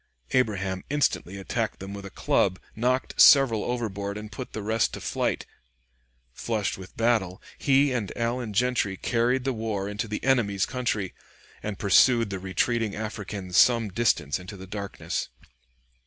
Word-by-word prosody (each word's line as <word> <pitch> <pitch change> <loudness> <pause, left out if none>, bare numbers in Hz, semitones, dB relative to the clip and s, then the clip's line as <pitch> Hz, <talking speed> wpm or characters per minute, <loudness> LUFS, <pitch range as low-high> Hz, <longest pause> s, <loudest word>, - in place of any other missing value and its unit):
Abraham 95 -7 0
instantly 140 -9 0
attacked 95 - -2
them 95 +1 -8
with 100 -1 -7
a - - -9
club, 95 -1 +1 0.2
knocked 125 +3 +1
several 130 -7 +7
overboard 100 -4 -3
and 105 0 -8
put 125 +4 -7
the 110 - -4
rest 110 +2 +1
to - - -7
flight; - - -1 0.9
flushed 110 - -2
with 95 0 -12
battle, 115 -6 +1 0.2
he 140 0 +3
and 115 -6 -2
Allen 120 -1 -1
Gentry 115 -4 +1
carried 125 +4 +1
the 135 0 0
war 110 -4 -3
into 105 +3 -3
the 105 0 -4
enemy's 105 -8 +2
country, 115 -7 -2 0.5
and 105 -2 -4
pursued 115 +2 +4
the 95 - -3
retreating 105 +3 0
Africans 105 -4 -4
some 115 -3 +5
distance 95 - +1
in 90 - -12
the 95 -2 -8
darkness. 100 +1 -4
105 Hz, 150 wpm, -26 LUFS, 100-120 Hz, 0.9 s, several